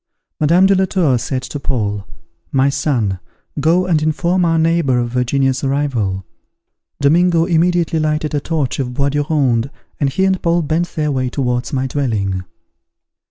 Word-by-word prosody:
Madame 170 +5 +4
de 195 - +5
la 190 0 +2
Tour 175 -8 +1
said 130 +2 -3
to 130 +3 -6
Paul, 105 -8 -2 0.4
"My 135 +1 +3
son, 125 -9 -1 0.4
go 170 +5 +2
and 165 -4 +1
inform 170 +4 +1
our 165 -1 +2
neighbour 160 -5 +2
of 120 -1 -1
Virginia's 130 +2 0
arrival." 125 -9 -1 0.7
Domingo 165 +3 +3
immediately 170 -1 +1
lighted 155 0 -1
a 145 - +1
torch 150 -4 -2
of 125 -2 -3
bois 140 +1 +1
de 145 +1 0
ronde, 135 -5 +1 0.3
and 140 - +1
he 190 +8 0
and 190 -1 +1
Paul 170 0 +1
bent 165 +3 -1
their 150 -1 0
way 130 -2 -1
towards 125 -2 -2
my 130 -1 -1
dwelling. 110 -9 -1
145 Hz, 160 wpm, -17 LUFS, 125-165 Hz, 0.7 s, de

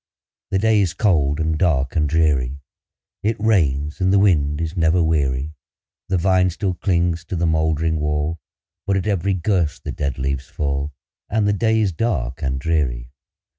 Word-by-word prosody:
The 95 - +1
day 110 +1 +3
is 90 -3 -1
cold, 75 -9 +2
and 80 -1 0
dark, 70 -7 +1
and 75 -3 +1
dreary; 70 -4 +1 0.6
It 110 +1 -1
rains, 75 -9 +1
and 95 0 +3
the 100 - +4
wind 75 -7 +2
is 80 +1 -3
never 85 0 +3
weary; 75 -2 0 0.6
The 95 - +2
vine 95 +1 +3
still 90 +2 -2
clings 85 -2 0
to 90 - -4
the 85 0 0
moldering 80 0 +1
wall, 75 +2 -1 0.5
But 100 -1 +2
at 95 - -2
every 100 -2 0
gust 90 -4 -1
the - - -4
dead 70 -3 -3
leaves 70 0 -2
fall, 70 0 -2 0.4
And 105 -1 +1
the 105 - +3
day 110 +2 +2
is 100 -3 +1
dark 80 - -2
and 65 -3 -1
dreary. 65 -6 -1
80 Hz, 170 wpm, -21 LUFS, 75-95 Hz, 0.6 s, the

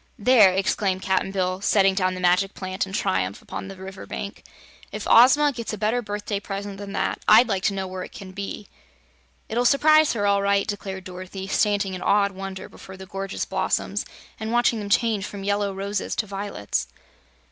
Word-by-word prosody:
"There," 215 -3 +6
exclaimed 190 0 0
Cap'n 190 0 +1
Bill, 185 -1 -1
setting 195 -1 +3
down 185 -1 0
the - - -6
Magic 185 +2 +2
Plant 185 +1 -3
in - - -9
triumph 95 - -1
upon - - -7
the 195 - -8
river 190 0 -9
bank, 200 - -6 0.5
"if - - -5
Ozma 285 +5 +6
gets 235 -4 -5
a - - -4
better 220 +4 0
birthday 205 -1 -4
present 200 0 -6
than 200 -1 -7
that, - - -1
I'd 225 +3 +7
like 195 -4 -1
to 200 - +1
know 190 -1 -2
what 185 0 -6
it - - -10
can 190 -2 -10
be!" 200 +1 -6 0.8
"It'll 240 +2 0
s'prise 310 +4 +5
her, 205 -3 -1
all 200 0 +3
right," 200 0 +2
declared 195 -2 -5
Dorothy, 185 +1 -7
standing 200 -1 +1
in 185 - -6
awed 200 0 +3
wonder 195 0 -7
before 190 0 -12
the 190 - -9
gorgeous 195 +1 -4
blossoms - - -1 0.4
and 220 0 -4
watching 240 -1 +2
them 205 -1 -5
change 220 -3 +2
from 200 -1 -8
yellow 200 0 0
roses 200 +2 -3
to 220 - -1
violets. 195 - -3
200 Hz, 190 wpm, -24 LUFS, 190-210 Hz, 0.8 s, I'd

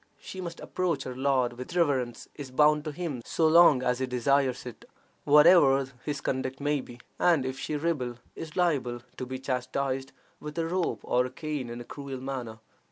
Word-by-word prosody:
She 190 - -8
must 170 -2 -6
approach 170 -7 -2
her 125 - -6
lord 130 -2 +1
with 125 +7 -8
reverence; 135 -8 0
is 140 -3 -8
bound 150 +3 +3
to 155 - -3
him 150 -5 -4
so 160 +6 +1
long 155 -5 +6
as 125 0 +1
he 130 - -1
desires 130 +1 +1
it, 125 - -9 0.4
whatever 145 -2 +6 0.2
his 145 -2 -3
conduct 130 0 -2
may 145 0 0
be; 120 -1 -12 0.2
and 165 -7 +3
if 130 +1 -4
she 155 - -3
rebel, 145 -6 -1 0.2
is 160 -2 -8
liable 135 -9 +1 0.2
to 130 - -5
be 130 +1 -4
chastised 130 +1 -2 0.3
with 150 +2 -8
a 165 - 0
rope 165 - -1
or 125 +1 +1
a - - -9
cane 145 -1 -4
in 120 +1 -6
a - - -6
cruel 140 -1 -7
manner. 125 -4 -5
135 Hz, 190 wpm, -28 LUFS, 125-150 Hz, 0.4 s, long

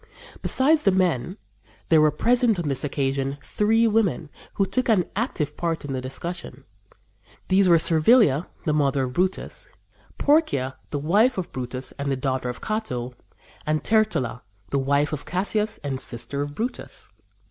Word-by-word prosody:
Besides 300 +4 +3
the 195 - +3
men, 180 - 0 0.5
there 160 -2 +6
were 155 - +5
present 240 - +2
on 170 -3 -2
this 135 - 0
occasion 135 -1 -1
three 225 +2 +2
women, 205 -9 +1 0.2
who 195 - +2
took 255 +5 -1
an 195 -6 +4
active 155 - -2
part 165 -3 -2
in 140 - -4
the 130 - -2
discussion. 150 +7 -6 0.9
These 190 0 +4
were 170 - +7
Servilia, 165 - +4 0.2
the 155 - +1
mother 140 -2 +1
of 125 -1 -4
Brutus, 185 +5 -2 0.5
Porcia, 145 - +2
the 145 - -2
wife 205 - +2
of 185 - -4
Brutus 130 0 -4
and 140 0 -2
the - - +1
daughter 130 -1 -2
of 125 - -7
Cato, 130 - -3 0.5
and 155 -1 -1
Tertulla, 175 - +1 0.3
the 140 - +1
wife 140 +3 +1
of 150 - -4
Cassius 210 +5 -1
and 135 -2 -3
sister 120 +2 -4
of 145 0 -4
Brutus. 240 +3 -5
155 Hz, 160 wpm, -24 LUFS, 135-210 Hz, 0.9 s, were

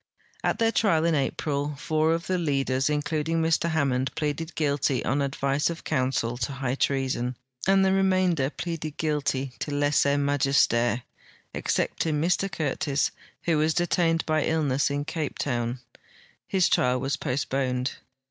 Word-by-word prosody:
At - - +1
their 225 0 +2
trial, 165 -9 +2
in 170 - +2
April, 145 0 -1
four 155 +2 +1
of 170 - -5
the 185 -1 0
leaders,* 135 -4 0
including 150 +2 0
Mr 165 +1 +2
Hammond, 135 -5 +1
pleaded 155 +2 -3
guilt}", 145 -2 +1 0.2
on 140 +3 +1
advice 140 +1 0
of 165 -1 -6
counsel, 130 -2 0
to 130 +3 -2
higli 135 -1 -3
treason, 130 -2 0 0.3
and 195 0 +5
the 190 - +3
remainder 185 -7 +2
pleaded 160 -2 -5
guilty 140 -4 -1
to - - -3
lese 145 0 +2
majeste,t 135 -4 +2 0.5
excepting 155 -2 0
Mr 180 +4 +1
Curtis, 145 -2 0 0.3
who 165 -3 +2
was 155 +1 +2
detained 170 -1 +1
by 155 -1 +1
illness 145 -4 +1
in 145 0 -2
Cape 155 -2 -3
Town. 120 -2 -2 0.7
His 190 -2 +3
trial 125 0 +2
was 135 +3 -1
postponed. 130 -2 -1
145 Hz, 145 wpm, -26 LUFS, 135-160 Hz, 0.7 s, and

